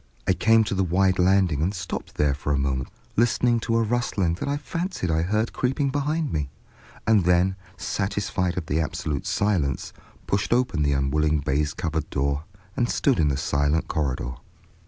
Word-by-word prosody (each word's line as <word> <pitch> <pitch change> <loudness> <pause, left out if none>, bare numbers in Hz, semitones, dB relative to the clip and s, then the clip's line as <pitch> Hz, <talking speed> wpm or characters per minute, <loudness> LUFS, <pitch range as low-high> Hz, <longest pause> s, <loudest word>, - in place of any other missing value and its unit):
I - - +3
came 110 +5 +4
to 105 - -2
the 95 0 +1
wide 95 +1 +2
landing 90 -5 +3
and 95 +6 0
stopped 90 -1 -5
there 75 -2 +2
for 70 +1 -3
a 70 - +2
moment 70 -2 -1 0.3
listening 120 +1 +3
to 115 +1 0
a 115 - +3
rustling 105 -6 0
that - - -2
I 145 - 0
fancied 165 - -3
I 80 0 +2
heard 105 +6 0
creeping 135 +2 0
behind 150 +2 -1
me, 75 -3 -1 0.6
and 110 -4 +4
then, 90 +2 +3 0.2
satisfied 95 -3 -1
of 85 - -2
the 75 +2 0
absolute 80 -4 -3
silence, 90 -10 0 0.3
pushed 100 +3 0
open 125 -10 +1
the 70 -1 +2
unwilling 75 +3 +1
baize 75 +1 -1
covered 80 -3 -2
door 70 +2 -1 0.3
and 120 -1 +1
stood 135 -8 +2
in 75 - +4
the 70 -2 +1
silent 70 +3 +1
corridor. 65 -5 -2
90 Hz, 180 wpm, -25 LUFS, 75-110 Hz, 0.6 s, came